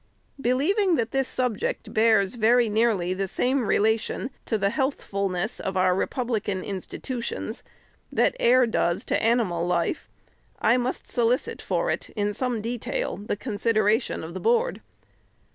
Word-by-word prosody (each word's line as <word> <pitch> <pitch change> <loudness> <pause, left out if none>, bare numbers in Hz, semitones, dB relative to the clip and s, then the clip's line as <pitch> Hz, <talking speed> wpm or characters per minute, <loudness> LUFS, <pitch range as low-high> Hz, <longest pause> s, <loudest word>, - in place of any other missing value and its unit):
Believing 335 - +2
that 230 -4 -1
this 270 -1 0
subject 250 -5 -2
bears 220 -3 +3
very 235 0 +3
nearly 210 -5 +1
the 195 +1 -2
same 250 +4 0
relation 220 +4 +1
to 220 - 0
the 200 -1 +1
healthfulness 200 - -2
of 190 0 -3
our 185 0 +4
republican 210 -2 -1
institu 230 +5 -5
tions - - -4 0.5
that - - +2
air 250 +1 +5
does 175 -6 0
to - - 0
animal 215 -7 +1
life, 175 - -1 0.5
I 230 +3 +4
must 250 +1 -2
solicit 250 - 0
for - - 0
it, - - -4
iu; 205 0 0
ome 245 -4 0
detail, 245 - -3
the 205 0 -4
consideration 215 -1 0
of 165 +1 -7
the 185 - -5
Board. 475 +2 +1
225 Hz, 145 wpm, -25 LUFS, 200-255 Hz, 0.5 s, air